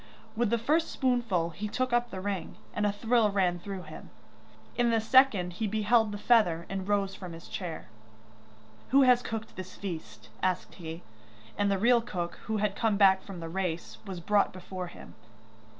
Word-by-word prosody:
With 235 -1 +1
the 235 - +2
first 305 +8 +1
spoonful 230 -10 0
he 200 +7 -5
took 255 +3 -1
up 240 0 +2
the 190 -4 -6
ring, 195 -4 -3 0.2
and 210 0 +1
a - - +2
thrill 225 +1 +2
ran 185 -3 +1
through 195 0 -6
him; 155 -1 -11 0.7
in 240 -1 +2
the 230 -1 +3
second 220 -6 +4
he 215 +5 -2
beheld 220 +1 +2
the 205 - -4
feather 205 -7 +3
and 195 -1 -4
rose 200 -1 +1
from 180 -3 -8
his 165 +1 -11
chair. 175 -4 -5 1.0
'Who 275 +2 +6
has 250 -1 +5
cooked 225 -2 -5
this 185 0 -8
feast?' 110 - -7
asked 185 -1 -1
he, 165 -1 -8 0.5
and 205 0 +1
the 200 - +2
real 235 +4 +4
cook, 180 -7 -4
who 220 -1 -1
had 205 -1 0
come 220 -2 +1
back 190 -2 +6
from 190 -4 -9
the 165 - -5
race, 175 -1 -3
was 190 -4 -6
brought 200 +4 +2
before 185 0 -6
him. 175 - -12
200 Hz, 185 wpm, -29 LUFS, 180-225 Hz, 1.0 s, Who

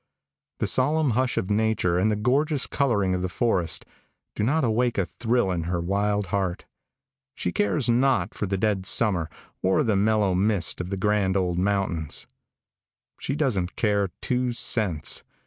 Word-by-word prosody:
The - - -1
solemn 145 +2 +2
hush 125 +2 0
of 95 - -1
nature 105 -5 +1
and 105 +4 +2
the 105 - +1
gorgeous 135 +6 +1
coloring 105 -9 0
of 90 - -1
the 90 - -2
forest 95 -5 0 0.5
do - - -3
not 140 +8 +1
awake 120 +1 0
a 95 - +1
thrill 115 -3 -1
in 85 -2 -2
her 85 0 -2
wild 100 +3 0
heart. 95 -3 -2 0.7
She 90 - -3
cares 110 +8 0
not 125 +3 +2
for 100 - -3
the 95 +1 -1
dead 100 -2 0
summer 95 -8 +2 0.3
or 95 0 +2
the 110 -3 +1
mellow 105 -1 +2
mist 95 -1 +1
of 90 - -6
the 100 - -3
grand 100 -1 +1
old 90 -2 -1
mountains. 95 -5 -1 0.9
She 140 - -3
doesn't 110 - -1
care 100 -3 +1
two 125 -1 -1
cents. 100 -9 +2
105 Hz, 165 wpm, -25 LUFS, 95-120 Hz, 0.9 s, solemn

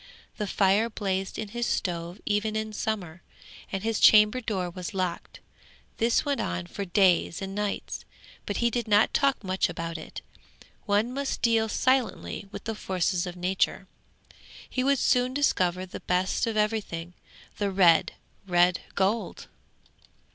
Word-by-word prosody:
The 210 - -2
fire 200 +4 +2
blazed 195 -3 -3
in 215 - -4
his 240 +3 -2
stove 175 +1 -2
even 210 +1 0
in 220 0 -3
summer, 185 -6 -3 0.5
and 195 0 -3
his 225 -1 0
chamber 215 +3 +6
door 195 -6 -2
was 185 +4 -7
locked. 185 -2 -3 0.6
This 230 +1 +2
went 285 -1 0
on 90 0 -3
for 200 - -5
days 180 -2 +3
and 195 0 -5
nights, 205 0 -3 0.4
but - - -2
he 235 0 +2
did 240 0 -2
not 210 0 +4
talk 275 -4 +2
much 185 0 0
about 165 -1 -5
it. 155 - -9 0.7
One 210 +4 +1
must 280 +1 -3
deal 225 -2 +3
silently 255 -5 0
with - - -8
the 225 - -3
forces 185 -3 -1
of 175 - -6
nature. 180 +1 -1 0.8
He 255 - -2
would 280 +1 +3
soon 250 +1 +2
discover 185 -10 +1
the 185 - -8
best 180 +4 0
of 225 -1 -2
everything, 210 -6 -1 0.5
the 205 -1 +1
red, 180 -4 +4 0.3
red 175 -1 +3 0.2
gold! 200 +4 -1
200 Hz, 150 wpm, -27 LUFS, 180-225 Hz, 0.8 s, chamber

